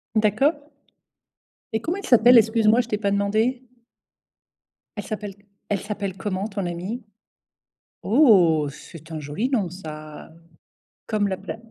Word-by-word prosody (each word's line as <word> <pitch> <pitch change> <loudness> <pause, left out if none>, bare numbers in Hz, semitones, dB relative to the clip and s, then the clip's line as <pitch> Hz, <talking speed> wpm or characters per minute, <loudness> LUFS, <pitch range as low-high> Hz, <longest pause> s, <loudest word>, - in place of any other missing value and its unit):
D'accord. 280 - +1 1.0
Et 220 - +1
comment 340 +8 -2
elle 400 - -7
s'appelle? 245 0 +6
Excuse 220 -1 +3
moi, 230 +3 +5
je 235 - -9
t'ai 210 - -1
pas 200 -1 -1
demandé. 215 +6 0 1.3
Elle 205 - -4
s'appelle 205 -2 -6 0.3
elle 205 - 0
s'appelle 200 -2 -4
comment, 195 0 -3
ton 200 -3 -4
amie? 180 +8 -5 1.0
Oh, 190 - +4
c'est 160 +2 -13
un 155 - -4
joli 150 - -3
nom, 210 -10 0
ça. 155 -3 -10 0.8
Comme 210 -2 0
la 190 -1 -2
pla - - -7
205 Hz, 140 wpm, -23 LUFS, 185-230 Hz, 1.3 s, s'appelle